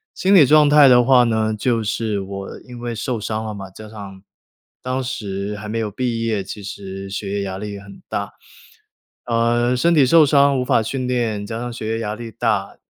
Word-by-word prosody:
心 195 +2 +2
理 155 -7 +8
状 150 +2 +5
态 145 -2 +7
的 125 -1 +6
话 125 -1 +5
呢， 110 -2 0
就 115 0 0
是 105 -1 -2
我 100 0 -7
因 125 -2 -11
为 120 -1 -4
受 115 +1 -3
伤 110 +1 -3
了 110 - -4
嘛， 95 -1 -8
加 110 +2 -11
上 100 -3 -10 0.6
当 130 +1 -2
时 105 -5 -4
还 105 +1 -8
没 115 +1 -2
有 110 -2 -2
毕 115 +1 -2
业， 105 -4 -1
其 105 +2 -8
实 95 0 -7
学 100 0 -5
业 100 - -1
压 95 -1 -4
力 105 +1 -6
也 100 - -7
很 100 0 -14
大。 - - -4 0.9
呃， 120 +1 +1
身 170 +6 +3
体 140 -3 +5
受 160 +3 +6
伤 140 -2 +4
无 125 - -1
法 125 -4 +2
训 130 +2 -3
练， 115 -5 -1
加 115 +2 -5
上 120 0 -4
学 110 -2 -6
业 115 - -2
压 105 -2 -3
力 115 0 -8
大， 105 -4 -1
115 Hz, 235 characters per minute, -20 LUFS, 100-125 Hz, 0.9 s, 理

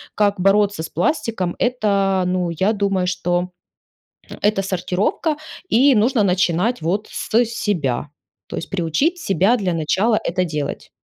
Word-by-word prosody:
как 205 -2 +1
бороться 200 -1 +2
с 160 - -6
пластиком- 185 - -1
это, 200 -6 +1
ну, 180 -1 0
я 190 +7 +1
думаю, 195 -3 0
что 180 0 -1 0.9
это 210 -1 +2
сортировка. 195 - -1 0.3
И 265 +4 +5
нужно 220 +1 +3
начинать, 185 +4 +1
вот, 195 +6 -1
с - - -6 0.2
себя. 150 - -2 0.4
То - - -6
есть - - -5
приучить 195 - 0
себя 195 - +2
для 185 -4 -1
начала 190 +8 +1
это 185 +1 0
делать. 150 -3 -4
195 Hz, 135 wpm, -20 LUFS, 175-215 Hz, 0.9 s, И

